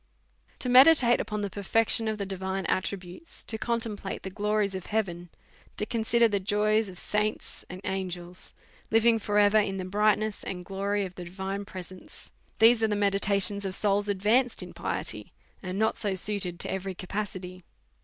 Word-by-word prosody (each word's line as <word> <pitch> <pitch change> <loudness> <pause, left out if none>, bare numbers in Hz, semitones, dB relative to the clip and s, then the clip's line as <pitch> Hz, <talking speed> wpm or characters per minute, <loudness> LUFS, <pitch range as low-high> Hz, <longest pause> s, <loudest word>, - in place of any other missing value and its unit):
To - - -3
meditate 255 -1 +7
upon 210 -1 -4
the 200 - -2
perfection 225 +2 +2
of 215 -1 -1
the 200 - -3
divine 190 0 -3
attri 190 +1 -1
butes, 185 - -13
to 220 - -2
contemplate 225 -4 -3
the 190 - -6
glories 210 0 0
of 185 -2 -6
heaven, 175 -5 -2 0.5
to 210 - -2
con 225 +1 -2
sider 235 +1 +4
the 205 -2 0
joys 210 +2 +1
of 180 - -10
saints 210 +3 -2
and 180 +1 -8
angels 180 -2 -5 0.3
living 225 +1 +4
for 205 0 -1
ever 205 +1 +5
in 195 -2 -1
the 185 - -4
brightness 210 +2 +1
and 180 -1 -6
glory 200 +1 -1
of 185 - -8
the 180 -1 -8
divine 190 +3 -5
presence; 185 -2 -10 0.3
these 225 +1 +6
are 220 - +3
the 210 - 0
meditations 200 0 +2
of 190 -1 -3
souls 205 0 0
advanced 220 +6 +2
in - - -10
piety, - - -5 0.3
and 185 0 -5
not 220 +1 +1
so 200 -3 -1
suited 185 -3 +1
to - - -3
every 190 0 -4
capacity. 185 -1 -5
200 Hz, 175 wpm, -28 LUFS, 190-215 Hz, 0.5 s, meditate